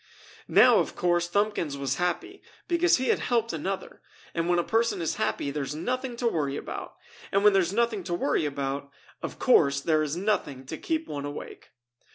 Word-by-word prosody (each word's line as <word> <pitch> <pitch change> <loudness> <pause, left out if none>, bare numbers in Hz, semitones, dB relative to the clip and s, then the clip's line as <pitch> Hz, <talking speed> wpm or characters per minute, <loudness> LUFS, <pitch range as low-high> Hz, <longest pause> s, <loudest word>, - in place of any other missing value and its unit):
Now - - +6
of - - -2
course 175 -1 +1
Thumbkins 200 -7 0
was 135 -1 -2
happy 360 - -2 0.3
because 345 0 +3
he 260 - -1
had - - +3
helped 230 -5 0
another, 190 +5 -4 0.3
and 165 +1 -1
when 175 - +3
a 175 - +2
person 225 -1 +1
is 165 -2 -2
happy 140 - -1
there 145 +1 -3
is 140 +2 -4
nothing 250 - -2
to 235 0 -1
worry 145 -9 -1
about, - - -6 0.4
and 195 +1 +2
when 210 -1 +7
there 195 - +5
is 175 0 -1
nothing 225 -2 0
to 175 - -1
worry 150 -2 +1
about, 140 0 -3 0.3
of - - -5
course 140 - +4
there 155 +1 +2
is 155 +1 -2
nothing 165 -10 -1
to 160 +4 -6
keep 320 -1 -2
one 145 -1 -4
awake. 145 0 -8
175 Hz, 200 wpm, -27 LUFS, 145-225 Hz, 0.4 s, when